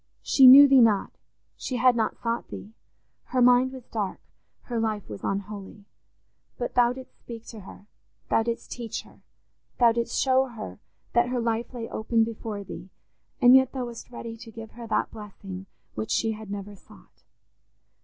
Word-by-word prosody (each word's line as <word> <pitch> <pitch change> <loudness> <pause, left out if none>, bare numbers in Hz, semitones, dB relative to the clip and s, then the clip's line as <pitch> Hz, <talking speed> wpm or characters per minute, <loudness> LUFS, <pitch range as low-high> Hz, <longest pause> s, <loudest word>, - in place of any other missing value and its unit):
She 265 -2 +6
knew 280 +3 +11
Thee 270 -2 +6
not; 215 -4 +3 0.4
she 255 - -5
had 250 0 +4
not 225 -2 -1
sought 235 0 -2
Thee; 215 - -10 0.5
her 255 - -2
mind 250 +1 +5
was 260 -2 -10
dark; 205 -4 -4 0.4
her 235 -2 -3
life 215 -2 -2
was 105 -2 -9
unholy. 200 +1 -5 0.7
But 240 - -4
Thou 245 -1 +4
didst 260 0 -13
speak 230 -1 -10
to 225 - -9
her, 200 +1 -13 0.5
Thou - - +4
didst 230 +1 -4
teach 235 -3 -5
her, - - -20 0.6
Thou 240 -2 +6
didst 235 0 -2
show 265 0 +3
her 225 -4 -9 0.3
that 240 +1 +3
her 250 0 -1
life 230 0 -2
lay 235 -3 -6
open 225 +1 0
before 220 -2 -5
Thee, 190 0 -9 0.5
and 245 +1 +7
yet 265 -1 +4
Thou 260 -2 -3
wast 235 -1 -9
ready 230 -2 -7
to 230 0 -12
give 225 0 -10
her 235 -1 -10
that - - 0
blessing 195 -3 -9 0.3
which 110 0 -5
she 225 - +1
had 215 -1 -8
never 205 0 -6
sought. - - -20
230 Hz, 175 wpm, -26 LUFS, 210-245 Hz, 0.7 s, knew